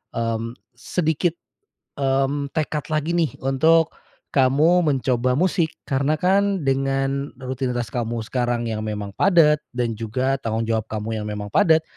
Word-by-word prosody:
mmm, 115 Hz, 0 st, -2 dB, 0.2 s
sedikit, 160 Hz, +5 st, -1 dB, 0.6 s
mmm, 135 Hz, +1 st, 0 dB
tekad 150 Hz, -2 st, -2 dB
lagi 155 Hz, +2 st, 0 dB
nih, 165 Hz, -3 st, 0 dB
untuk, 160 Hz, +5 st, +3 dB, 0.4 s
kamu 145 Hz, +6 st, +4 dB
mencoba 130 Hz, -2 st, +1 dB
musik. 170 Hz, 0 st, +1 dB
Karena 140 Hz, +2 st, +1 dB
kan, 195 Hz, +2 st, +2 dB
dengan, 135 Hz, 0 st, 0 dB
rutinitas 125 Hz, -3 st, -3 dB
kamu 115 Hz, -1 st, -2 dB
sekarang 120 Hz, -2 st, -1 dB
yang 110 Hz, -1 st, -2 dB
memang 105 Hz, -1 st, -4 dB
padat, 155 Hz, -6 st, +5 dB, 0.2 s
dan 120 Hz, -2 st, 0 dB
juga 130 Hz, +5 st, -1 dB
tanggung 115 Hz, -2 st, -2 dB
jawab 110 Hz, -1 st, -1 dB
kamu 110 Hz, +1 st, -3 dB
yang 105 Hz, -, -5 dB
memang 105 Hz, -1 st, -5 dB
padat, 160 Hz, +5 st, +4 dB
135 Hz, 135 wpm, -22 LUFS, 115-155 Hz, 0.6 s, padat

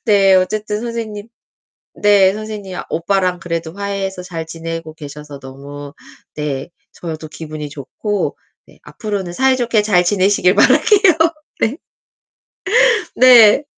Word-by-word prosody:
네 195 Hz, -2 st, +5 dB
어쨌든 210 Hz, +3 st, -1 dB
선생님 230 Hz, -2 st, -6 dB, 0.7 s
네 200 Hz, -2 st, +4 dB
선생님 210 Hz, -3 st, -7 dB
아 -, -, -6 dB
오빠랑 180 Hz, +1 st, 0 dB
그래도 165 Hz, -1 st, -4 dB
화해해서 195 Hz, -2 st, -4 dB
잘 165 Hz, -3 st, -6 dB
지내고 165 Hz, -1 st, -6 dB
계셔서 150 Hz, -1 st, -10 dB
너무 140 Hz, +2 st, -10 dB, 0.4 s
네 145 Hz, -2 st, -4 dB, 0.2 s
저도 160 Hz, -2 st, -7 dB
기분이 155 Hz, -2 st, -7 dB
좋고. 175 Hz, -, -4 dB, 0.3 s
네 -, -, -21 dB
앞으로는 200 Hz, -5 st, -5 dB
사이좋게 245 Hz, -2 st, +2 dB
잘 180 Hz, -4 st, +3 dB
지내시길 190 Hz, 0 st, +2 dB
바랄게요. 380 Hz, -, +5 dB, 0.5 s
네. 225 Hz, +4 st, +1 dB, 1.4 s
네. 245 Hz, 0 st, +7 dB
190 Hz, 255 characters per minute, -17 LUFS, 160-210 Hz, 1.4 s, 네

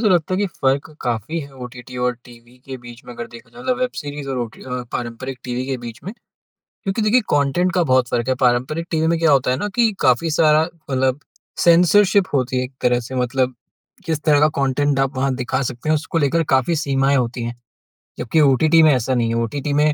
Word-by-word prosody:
तो 220 Hz, -, +3 dB
लगता 180 Hz, -1 st, +2 dB
है -, -, -1 dB
कि 205 Hz, -, +1 dB
फ़र्क 135 Hz, +3 st, +1 dB
काफ़ी 120 Hz, +7 st, -2 dB
है 140 Hz, -2 st, -10 dB
ओटीटी 125 Hz, 0 st, -10 dB
और 125 Hz, -, +1 dB
टीवी 120 Hz, 0 st, -17 dB
के 135 Hz, -1 st, -6 dB
बीच 120 Hz, 0 st, -12 dB
में 125 Hz, -, -9 dB
अगर 120 Hz, 0 st, -6 dB
देखा 115 Hz, 0 st, -14 dB
जाए -, -, -16 dB
तो -, -, -9 dB
मतलब 255 Hz, -1 st, 0 dB
वेब 255 Hz, -, 0 dB
सीरीज़ 145 Hz, -1 st, -6 dB
और 135 Hz, -1 st, -2 dB
ओटी 120 Hz, -2 st, -6 dB
अ, 125 Hz, -1 st, -4 dB
पारंपरिक 125 Hz, +2 st, -5 dB
टीवी 125 Hz, 0 st, -3 dB
के 135 Hz, -1 st, -2 dB
बीच 115 Hz, -1 st, -8 dB
में। 195 Hz, -, -5 dB, 0.7 s
क्योंकि 195 Hz, +3 st, -1 dB
देखिए 215 Hz, +4 st, +4 dB
कॉन्टेंट 145 Hz, +6 st, +1 dB
का 180 Hz, -1 st, +2 dB
बहुत 130 Hz, -1 st, +4 dB
फ़र्क 120 Hz, +1 st, -1 dB
है। 130 Hz, -, +2 dB
पारंपरिक 130 Hz, +7 st, +1 dB
टीवी 160 Hz, -1 st, +1 dB
में 170 Hz, 0 st, +2 dB
क्या 165 Hz, -2 st, +3 dB
होता 130 Hz, -2 st, +3 dB
है 130 Hz, -, 0 dB
ना 205 Hz, -, -2 dB
कि 235 Hz, -2 st, +3 dB
काफ़ी 130 Hz, +4 st, +2 dB
सारा 155 Hz, 0 st, +4 dB, 0.3 s
मतलब 130 Hz, +1 st, +1 dB, 0.5 s
सेंसरशिप 185 Hz, +3 st, +5 dB
होती 130 Hz, -1 st, 0 dB
है 125 Hz, -, +1 dB
एक 130 Hz, +1 st, -8 dB
तरह 125 Hz, 0 st, +2 dB
से। 130 Hz, -, -6 dB
मतलब 125 Hz, +1 st, 0 dB, 0.5 s
किस 160 Hz, -3 st, -2 dB
तरह 150 Hz, -2 st, +4 dB
का 150 Hz, -, +5 dB
कॉन्टेंट 140 Hz, +1 st, +1 dB
आप 135 Hz, -1 st, 0 dB
वहाँ 135 Hz, 0 st, +1 dB
दिखा 130 Hz, +1 st, -2 dB
सकते 125 Hz, +5 st, -6 dB
हैं 155 Hz, -, +4 dB
उसको 160 Hz, +2 st, -3 dB
लेकर 165 Hz, +2 st, +2 dB
काफ़ी 130 Hz, +6 st, +1 dB
सीमाएँ 140 Hz, -2 st, +1 dB
होती 120 Hz, -1 st, -2 dB
हैं 120 Hz, +1 st, -4 dB, 0.6 s
जबकि 125 Hz, +7 st, 0 dB
ओटीटी 150 Hz, +4 st, +4 dB
में 155 Hz, -, +6 dB
ऐसा 130 Hz, 0 st, 0 dB
नहीं 120 Hz, -2 st, +1 dB
है। 115 Hz, -, -1 dB
ओटीटी 140 Hz, +5 st, -3 dB
में 150 Hz, +1 st, +3 dB
135 Hz, 230 wpm, -20 LUFS, 125-160 Hz, 0.7 s, में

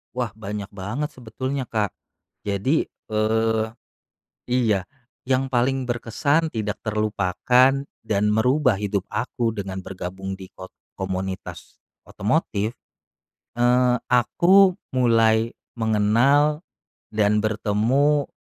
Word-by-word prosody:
Wah 125 Hz, -4 st, -2 dB
banyak 105 Hz, -2 st, -6 dB
banget 105 Hz, +10 st, -4 dB
sebetulnya 130 Hz, +1 st, -4 dB
Kak. 105 Hz, -3 st, -1 dB, 0.5 s
Jadi, 105 Hz, +10 st, +1 dB, 0.3 s
eee 110 Hz, +1 st, +1 dB, 0.8 s
iya, 115 Hz, -6 st, +2 dB, 0.4 s
yang 130 Hz, +1 st, +1 dB
paling 130 Hz, +1 st, 0 dB
berkesan, 140 Hz, +7 st, 0 dB
tidak 105 Hz, -2 st, -3 dB
terlupakan, 110 Hz, +5 st, +2 dB, 0.2 s
dan 105 Hz, -2 st, 0 dB
merubah 125 Hz, +4 st, +3 dB
hidup 100 Hz, -1 st, -2 dB
aku 115 Hz, 0 st, -2 dB
dengan 95 Hz, -2 st, -4 dB
bergabung 95 Hz, +1 st, -6 dB
di 95 Hz, -1 st, -12 dB
ko 95 Hz, -, -10 dB, 0.3 s
komunitas 95 Hz, 0 st, -5 dB, 0.2 s
otomotif, 110 Hz, -1 st, -1 dB, 0.8 s
eee, 125 Hz, +1 st, +3 dB
aku 180 Hz, -, +5 dB, 0.2 s
mulai 115 Hz, -2 st, +3 dB, 0.2 s
mengenal 120 Hz, +8 st, +3 dB, 0.5 s
dan 105 Hz, 0 st, +2 dB
bertemu 115 Hz, +7 st, +1 dB
110 Hz, 95 wpm, -23 LUFS, 105-130 Hz, 0.8 s, aku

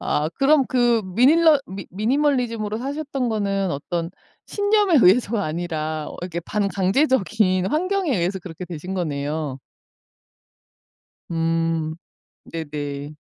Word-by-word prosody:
아 150 Hz, +1 st, 0 dB
그럼 275 Hz, 0 st, +4 dB
그 240 Hz, -3 st, +2 dB
미닐러 280 Hz, -, +5 dB
미 190 Hz, -1 st, -8 dB
미니멀리즘으로 230 Hz, -1 st, 0 dB
사셨던 275 Hz, -1 st, -3 dB
거는 195 Hz, -3 st, 0 dB
어떤 165 Hz, +4 st, -3 dB, 0.4 s
신념에 410 Hz, -3 st, +2 dB
의해서가 215 Hz, +1 st, +4 dB
아니라 155 Hz, -1 st, -3 dB
어 -, -, -9 dB
이렇게 175 Hz, -1 st, -4 dB
반강제적인 200 Hz, -, +1 dB
환경에 360 Hz, -, 0 dB
의해서 180 Hz, +3 st, -1 dB
그렇게 180 Hz, 0 st, -8 dB
되신 180 Hz, +2 st, -6 dB
거네요. 145 Hz, -4 st, -3 dB, 1.7 s
음. 165 Hz, -1 st, 0 dB, 0.5 s
네네. 145 Hz, -2 st, -5 dB
190 Hz, 260 characters per minute, -22 LUFS, 165-255 Hz, 1.7 s, 미닐러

